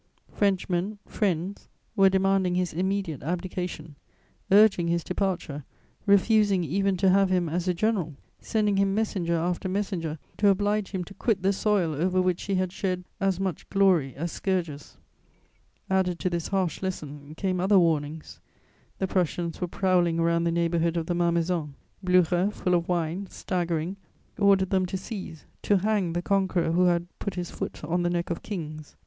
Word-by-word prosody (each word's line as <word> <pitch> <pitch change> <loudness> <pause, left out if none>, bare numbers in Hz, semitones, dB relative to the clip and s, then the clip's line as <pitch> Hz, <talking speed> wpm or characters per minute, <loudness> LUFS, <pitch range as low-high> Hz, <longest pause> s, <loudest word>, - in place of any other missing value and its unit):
Frenchmen, 195 0 0
friends, 190 -1 -2 0.3
were 195 -2 +6
demanding 190 -1 +2
his 180 -1 0
immediate 185 -3 -2
abdication, 175 -1 -4 0.6
urging 200 -4 +5
his 170 0 0
departure, 180 -6 -2 0.4
refusing 200 -1 +4
even 195 +4 0
to 190 0 +4
have 195 0 +4
him 180 -2 +1
as 175 +3 -2
a 180 - +3
general, 185 -6 0 0.2
sending 210 -2 0
him 195 0 +2
messenger 190 -6 0
after 175 +3 -1
messenger, 185 -5 -2 0.2
to 205 - +3
oblige 205 +1 +1
him 190 -2 -3
to 195 - -11
quit 195 -1 0
the 195 +1 +3
soil 195 -5 +1
over 180 +5 +1
which 180 -1 +1
he 195 - 0
had 185 -1 0
shed 185 -1 -2 0.2
as 195 -2 +1
much 190 -5 -3
glory 185 -9 +3
as 165 +4 -3
scourges. 170 -7 -3 0.9
Added 190 -2 +1
to 185 0 -2
this 170 -2 -2
harsh 190 -4 -1
lesson, 150 -5 -6
came 185 0 -1
other 195 +2 +4
warnings: 160 -3 0 0.6
the 190 - 0
Prussians 175 -2 -1
were 180 - 0
prowling 175 -2 +1
around 170 0 +2
the 170 - +2
neighbourhood 170 0 +1
of 165 - -1
the 175 - -1
Malmaison; 170 -3 0 0.3
Blücher, 180 +1 +3
full 180 -3 -1
of 170 -1 +1
wine, 175 +2 -1
staggering, 175 0 -2 0.4
ordered 195 -2 +4
them 190 -1 +2
to 190 - -3
seize, 185 -5 -7 0.2
to 205 - +3
"hang" 195 -3 0
the 175 +1 -2
conqueror 190 -4 +1
who 180 +2 +3
had 175 -1 +2
"put 200 -3 -4
his 175 -1 -4
foot - - -6
on 170 +4 0
the 175 - +1
neck 175 0 -2
of 170 - -3
Kings." 155 -6 -7
180 Hz, 165 wpm, -26 LUFS, 170-195 Hz, 0.9 s, were